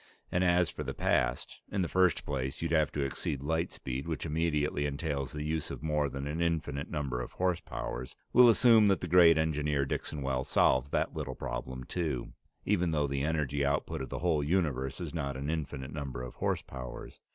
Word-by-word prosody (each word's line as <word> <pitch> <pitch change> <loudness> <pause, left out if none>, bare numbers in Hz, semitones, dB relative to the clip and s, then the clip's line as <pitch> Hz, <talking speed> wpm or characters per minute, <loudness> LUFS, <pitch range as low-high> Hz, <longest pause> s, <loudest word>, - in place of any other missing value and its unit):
And 90 - +2
as 90 -1 +3
for - - -7
the - - -4
past - - 0
in 100 -2 +1
the - - -1
first 90 0 +2
place, 65 0 -3
you'd 85 - -1
have 80 -4 +3
to 70 - 0
exceed 70 +1 -3
light 80 +3 0
speed, 65 +3 -5
which 80 -1 -3
immediately 75 -2 0
entails 70 -1 -3
the 75 -1 -4
use 80 0 -2
of - - -7
more 75 -2 +1
than 70 +1 -5
an 75 +4 -2
infinite 80 -4 -1
number 70 -5 -2
of - - -7
horsepowers. 65 -9 -3 0.2
We'll 125 0 +8
assume 115 -2 +6
that 95 -2 +3
the 90 - -3
great 85 -1 +7
engineer 75 -3 +1
Dixon 70 +1 -3
Wells 65 -1 -1
solves 65 +2 +3
that - - 0
little 70 -5 -4
problem 65 +2 -5
too, 75 -5 -3 0.3
even 90 -4 +2
though 75 -2 +1
the 70 -1 -2
energy 70 -2 0
out 70 +1 +1
put - - -5
of 65 - -5
the - - -4
whole 80 -4 +2
universe 70 -5 0
is 85 -4 -5
not 70 -5 -2
an 70 +3 -2
infinite 70 -4 -4
number 70 -5 -5
of 60 - -7
horsepowers. 65 -2 -4
75 Hz, 200 wpm, -31 LUFS, 70-80 Hz, 0.3 s, We'll